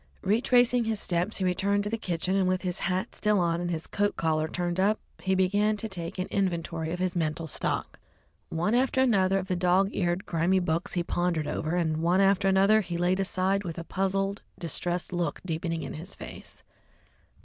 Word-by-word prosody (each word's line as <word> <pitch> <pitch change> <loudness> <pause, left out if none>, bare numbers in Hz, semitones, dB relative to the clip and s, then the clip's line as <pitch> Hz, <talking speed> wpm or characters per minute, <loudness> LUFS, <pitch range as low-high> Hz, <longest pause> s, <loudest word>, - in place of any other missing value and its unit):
Retracing 245 +3 +3
his 220 -2 -1
steps, 175 +4 -1
he 190 - -1
returned 200 +3 +1
to 205 - -3
the - - +1
kitchen, 185 -3 -2
and 190 -2 +2
with 185 +1 0
his 180 -2 -2
hat 185 +4 -1
still 210 -1 +1
on 170 -1 +1
and 175 - -2
his 165 -1 -3
coat 205 0 0
collar 155 -1 0
turned 175 +2 -2
up, 205 +3 +3 0.2
he 190 0 +1
began 205 +3 +2
to 220 - -3
take 175 -4 -5
an 185 - -1
inventory 170 -4 -1
of 175 - -2
his 185 0 -1
mental 160 -1 -1
stock. 155 - -3 0.5
One 175 +6 0
after 260 +1 +2
another 195 -7 +3
of 190 -1 -3
the 185 - 0
dog 180 +2 +3
eared, 175 +1 -1
grimy 170 +3 +1
books 170 -2 -1
he 175 - 0
pondered 170 -3 -1
over, 155 +3 -2
and 160 -3 0
one 170 +3 +2
after 195 0 +3
another 195 +3 +5
he 175 -4 -4
laid 180 +2 +1
aside, 195 +1 +1
with 170 -3 -5
a 170 - -4
puzzled, 195 +2 -1 0.2
distressed 175 +2 -2
look 175 -4 -1
deepening 165 -1 -2
in - - -5
his 170 +6 -7
face. - - -10
185 Hz, 200 wpm, -28 LUFS, 170-195 Hz, 0.5 s, another